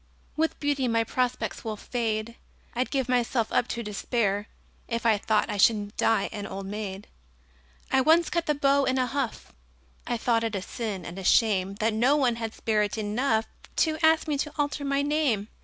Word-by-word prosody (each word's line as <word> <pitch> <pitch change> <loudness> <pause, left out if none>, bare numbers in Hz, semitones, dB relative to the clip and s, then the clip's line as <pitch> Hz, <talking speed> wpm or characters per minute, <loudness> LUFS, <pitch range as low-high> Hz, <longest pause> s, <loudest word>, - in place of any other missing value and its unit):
With 320 +1 0
beauty 285 -3 0
my 230 -1 +2
prospects 250 +2 -2
will 220 -2 -4
fade 225 -1 -2 0.4
I'd 250 +2 -1
give 265 -3 -1
myself 240 -2 +1
up 245 - +2
to 235 -1 -4
despair 210 -1 -1 0.4
If 230 -1 -3
I 220 -3 +4
thought 215 +1 +1
I 210 -2 -3
should 205 0 +3
die 225 -3 +2
an 205 -1 -5
old 195 0 -6
maid! 200 -1 -5 0.9
I 265 - +4
once 325 +5 +4
cut 340 -1 -1
the 300 - +2
beaux 280 0 +3
in 260 0 +1
a 255 - +2
huff 265 -2 -4 0.5
I 240 - 0
thought 230 0 +1
it 225 -2 -2
a 195 - -2
sin 205 -7 -5
and 175 +3 -7
a - - -6
shame 195 -2 +3
That 220 +2 0
no 245 +6 +3
one 250 -5 +2
had 225 -1 -4
spirit 210 -1 0
enough 220 +2 0 0.3
To 315 -1 +1
ask 320 0 +4
me 290 -2 -1
to 300 - -2
alter 290 0 -1
my 280 0 +1
name. 285 -9 0
230 Hz, 190 wpm, -27 LUFS, 210-275 Hz, 0.9 s, I